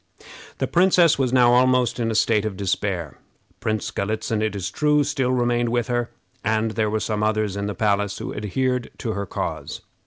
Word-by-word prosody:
The - - 0
princess 175 -3 +4
was 130 -3 +1
now 120 -2 +5
almost 125 -1 +3
in 115 -1 0
a 110 - -2
state 105 -1 +3
of 105 -3 -4
despair. 95 -6 -2 0.4
Prince 110 -2 -2
Galitzin, 110 +2 -2
it 110 -1 -1
is 95 -2 -3
true, 150 +2 +2
still 135 -3 0
remained 120 -1 +1
with 120 +1 -1
her, 120 -1 0 0.3
and 110 +1 +1
there 110 -1 0
were 110 +1 0
some 105 -1 -2
others 110 -2 0
in 100 0 -3
the 105 - -4
palace 105 -1 0
who - - -5
adhered 125 +4 -1
to 115 - -3
her 100 -2 -4
cause. - - -4
110 Hz, 190 wpm, -23 LUFS, 105-125 Hz, 0.4 s, now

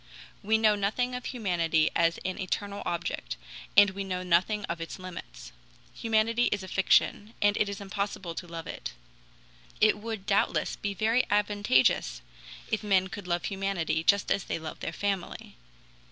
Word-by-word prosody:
We 220 +2 +3
know 220 -1 +4
nothing 215 +5 0
of 250 0 -5
humanity 170 -9 +1
as 165 0 +3
an 185 0 -2
eternal 200 +2 -3
object, 170 -1 -3 0.4
and 205 -1 +8
we 195 +1 -4
know 185 -1 -3
nothing 185 +4 +2
of 170 0 -4
its 165 - -6
limits. - - -9 0.4
Humanity 225 +1 +2
is 205 -2 0
a - - -7
fiction, 205 +3 +2
and 205 0 +3
it 210 - +1
is 200 - -5
impossible 200 -3 -4
to 175 - -6
love 165 -1 -7
it. - - -6 0.9
It 215 -1 +4
would, 220 -2 -5
doubtless, 200 -1 +1
be 200 -1 -4
very 225 +5 +3
advantageous 205 - +2 0.5
if 220 - +1
men 190 -2 +2
could 195 -1 -7
love 175 0 -1
humanity 190 -5 -1
just 200 +3 +3
as 195 - +1
they - - -2
love 160 -1 -7
their - - -3
family. 195 0 -3
195 Hz, 165 wpm, -29 LUFS, 175-210 Hz, 0.9 s, and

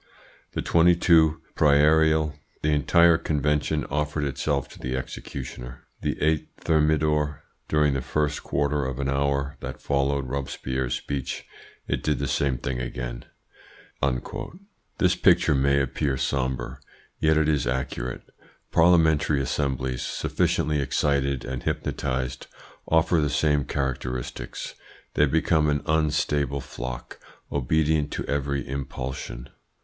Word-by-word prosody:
The - - -2
22 80 -2 +4
Prairial 75 +1 +4 0.3
the 75 - +2
entire 80 +3 +5
Convention 75 0 0
offered 75 +1 -1
itself 70 0 -1
to - - -13
the 65 +1 -2
executioner; 60 -1 -7 0.2
the - - -2
8 80 0 +1
Thermidor, 75 -1 +1 0.2
during 75 -2 +3
the 70 - -1
first 75 +3 -1
quarter 70 0 0
of 65 -1 -3
an 70 0 -1
hour 70 +1 0
that - - -6
followed 70 -1 0
Robespierre's 65 -1 -2
speech, 70 -1 -4 0.4
it - - -1
did 75 -1 0
the - - -2
same 70 -3 +1
thing 60 +1 -3
again." - - -5 1.7
This - - +3
picture - - +4
may 70 +1 +3
appear 70 0 -1
sombre. 65 -1 -2 0.4
Yet 80 0 +3
it 80 -1 +3
is 75 -5 +1
accurate. 65 -1 -3 0.5
Parliamentary 80 -4 +4
assemblies, 65 -2 -1
sufficiently 75 0 0
excited 70 -1 0
and 65 -1 -4
hypnotised, 65 -1 -2 0.4
offer 80 0 +3
the 75 - +1
same 75 -2 +2
characteristics. 65 -2 -4 0.4
They 75 - +4
become 80 +1 +2
an 75 0 0
unstable 75 -3 +1
flock, 60 0 -7 0.3
obedient 75 +2 +1
to - - -3
every 70 0 -1
impulsion. 65 -2 -5
70 Hz, 120 wpm, -25 LUFS, 65-75 Hz, 1.7 s, entire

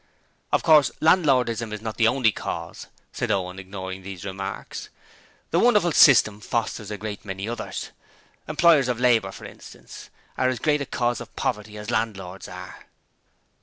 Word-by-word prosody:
'Of - - +2
course, 150 -5 +6
Landlordism 125 - +2
is 105 - -4
not 110 0 -6
the 115 - +4
only 120 -2 +3
cause,' - - -6 0.2
said 120 - -3
Owen, 95 -2 -1
ignoring 95 0 -7
these 95 -1 -8
remarks. 95 0 -6 0.6
'The 170 - +3
wonderful 210 -7 +4
system 110 -9 +6
fosters 110 -1 -3
a 105 - -4
great 105 0 -6
many 95 0 -5
others. 120 +1 -5 0.6
Employers 155 -3 +4
of 120 -2 -1
labour, 115 -6 +3
for - - -11
instance, - - -12 0.3
are 130 - +3
as 130 - -2
great 150 +4 +1
a 140 - -4
cause 120 -2 -1
of - - -11
poverty 105 0 -3
as 105 +2 -6
landlords 95 -5 -3
are.' - - -10
115 Hz, 160 wpm, -24 LUFS, 100-130 Hz, 0.6 s, course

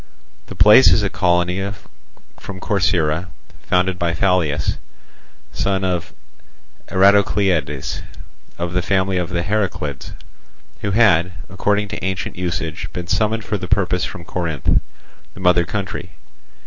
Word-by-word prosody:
The - - -9
place 105 -1 +7
is 95 +5 +3
a 100 - -1
colony 90 +2 +1 0.7
from 95 -1 -8
Corcyra, 90 -4 0 0.3
founded 90 0 0
by 85 0 0
Phalius, 85 -5 +1 0.8
son 95 -1 -1
of 90 -5 -2 0.8
Eratocleides, 95 -7 +2 0.6
of 85 0 -3
the 90 - +1
family 95 0 +1
of 90 - -3
the 85 -1 -1
Heraclids, 85 -9 -2 0.7
who 100 - -3
had 95 -5 +3 0.2
according 105 +2 0
to - - -6
ancient 95 0 -3
usage 85 -3 -4
been 90 -1 -4
summoned 110 +4 0
for 100 0 -2
the 90 - -5
purpose 90 -2 +1
from 85 - -6
Corinth, 80 -5 0 0.5
the - - -11
mother 90 -2 +3
country. 95 -1 -4
90 Hz, 125 wpm, -20 LUFS, 85-100 Hz, 0.8 s, place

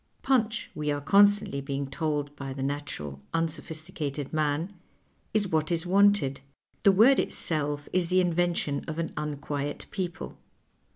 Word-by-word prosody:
" - - -38
Punch," 235 -4 +1
we 150 -1 -3
are 145 - -1
constantly 200 -1 +4
being 140 0 -3
told 145 0 -2
by 135 -2 -6
the 135 0 -4
natural 135 - -4
unsophisticated 155 -3 -3
man, 155 +4 0 0.6
is 210 -2 +1
what 155 0 0
is 170 0 0
wanted 190 -8 +3 0.2
— - - -42
the 200 - +7
word 230 +8 +6
itself 145 -2 -1
is 185 -2 +2
the 185 0 +4
invention 175 -4 +1
of 155 -1 -4
an 165 0 -1
untpiiet 145 -1 -4
people. 180 -3 -5
155 Hz, 150 wpm, -28 LUFS, 145-185 Hz, 0.6 s, the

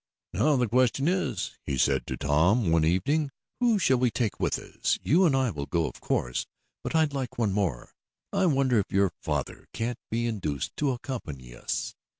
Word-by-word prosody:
"Now 150 -1 +3
the 125 -2 +2
question 130 +4 +2
is," 185 +1 -1
he 70 -3 -2
said - - +2
to - - -3
Tom 85 - +3
one 80 -1 +4
evening, 140 - +1 0.3
"who 240 -3 +3
shall 135 -9 +3
we 125 -1 +3
take 115 -2 -2
with - - +1
us? - - -1
You 180 +5 +4
and 140 - +2
I 130 -3 +2
will 70 -2 -5
go, 85 -2 +1
of - - -9
course, - - -1 0.4
but - - -3
I'd 155 -3 +3
like 130 -2 -4
one 110 -5 +1
more. 95 -12 -2 0.4
I 195 -2 +3
wonder 135 -6 +3
if 100 - -3
your 95 -1 +3
father - - -3
can't 120 +1 -3
be 115 +1 -1
induced 95 - -3
to 145 - +1
accompany 80 - -5
us? - - -3
120 Hz, 190 wpm, -27 LUFS, 85-140 Hz, 0.4 s, one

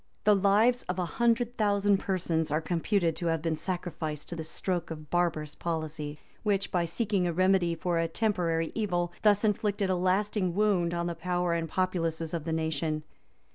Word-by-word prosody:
The 210 - +6
lives 210 +6 +4
of 180 - -1
a 180 - 0
hundred 235 +4 +1
thousand 205 -1 +3
persons 170 -5 -1
are 150 +1 +1
computed 170 +1 0
to 170 - -2
have 165 -1 0
been 165 -1 0
sacrificed 160 -4 -4
to 175 - -4
this 160 -1 -6
stroke 180 -3 -2
of 155 -2 -8
barbarous 160 -4 0
policy,[] 155 -3 -4 0.2
which, 200 -2 0
by 175 -2 +1
seeking 195 +1 0
a 170 - -1
remedy 185 -1 +3
for 170 0 -1
a 165 - +1
temporary 165 -4 0
evil, 175 -5 -1
thus 205 -1 +4
inflicted 205 -2 +1
a - - +2
lasting 185 0 +1
wound 190 -5 +2
on 170 0 -1
the 170 - -1
power 175 0 -1
and 165 -1 -1
populousness 165 -3 -1
of 165 -3 -3
the 165 - -2
nation. 160 -1 -1
175 Hz, 180 wpm, -29 LUFS, 165-200 Hz, 0.2 s, The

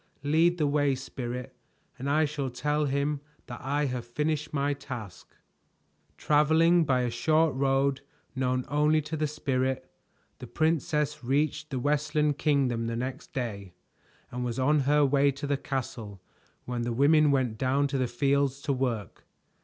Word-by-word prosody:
"Lead 165 +4 +3
the 155 - +1
way, 145 -1 +2
Spirit, 125 -2 -6 0.4
and 135 +2 -3
I 155 +2 +3
shall 145 -2 -3
tell 150 +4 -1
him 140 +1 -1 0.2
that 120 - -8
I 145 +3 0
have 125 -3 -3
finished 150 +5 -2
my 145 0 0
task." 125 -9 -9 0.8
Traveling 160 +3 +4
by 130 -3 +2
a 120 -1 -1
short 155 +5 +2
road 135 0 +1 0.3
known 130 -1 0
only 150 +2 +3
to 160 - -4
the 155 0 0
Spirit, 130 -3 -2 0.5
the - - -8
princess 150 -2 0
reached 150 +4 0
the 135 - -3
Westland 150 +2 0
Kingdom 130 -6 +1
the 115 - -2
next 130 +3 -5
day, 100 -8 -5 0.6
and 125 +1 -4
was 120 -1 -3
on 145 +3 +3
her 150 0 +5
way 140 +1 +3
to 145 +2 -6
the 140 0 +1
castle 120 -7 -5 0.5
when 125 -1 -3
the 120 0 -2
women 150 +4 +4
went 130 -6 0
down 135 +2 +2
to 140 -1 -1
the 130 - +1
fields 140 +2 +1
to 145 -3 0
work. 120 -7 -3
140 Hz, 160 wpm, -28 LUFS, 125-150 Hz, 0.8 s, her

